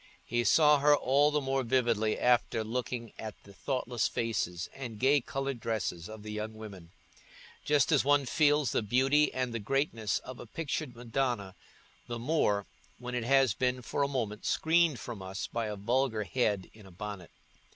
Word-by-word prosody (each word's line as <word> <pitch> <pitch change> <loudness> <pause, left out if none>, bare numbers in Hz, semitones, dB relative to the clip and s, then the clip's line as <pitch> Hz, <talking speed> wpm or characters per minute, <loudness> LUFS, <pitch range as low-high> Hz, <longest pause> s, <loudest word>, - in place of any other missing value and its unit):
He 120 +1 0
saw 150 +3 +5
her 145 +1 +6
all 145 +2 +3
the 150 0 +1
more 135 0 0
vividly 115 -3 +1
after 120 -2 +2
looking 120 0 -4
at 110 -1 -6
the 100 - -15
thoughtless 125 0 -1
faces 90 -7 -2
and 120 -5 -7
gay 135 +4 +4
coloured 135 +1 -3
dresses 110 -6 -3
of 110 -1 -9
the 105 - -6
young 105 +1 -4
women—just 110 - -4
as 150 - +4
one 145 0 +3
feels 145 0 +3
the - - +1
beauty 135 +7 +3
and 130 -2 -2
the 115 - -2
greatness 115 -2 0
of 130 -1 -9
a - - -9
pictured 150 -1 -4
Madonna 120 -4 -2 0.5
the 120 -1 -4
more 115 -6 +1 0.3
when 125 0 -7
it 120 -2 -2
has 135 -3 +4
been 125 +2 -1
for 140 - -2
a 140 - +3
moment 115 -6 -3
screened 160 -4 +2
from 115 -5 -7
us 95 +2 -5
by 115 -1 -3
a 105 - -4
vulgar 115 +2 0
head 105 -4 -1
in 105 -3 -15
a - - -14
bonnet. 95 -1 -7
120 Hz, 175 wpm, -30 LUFS, 110-135 Hz, 0.5 s, her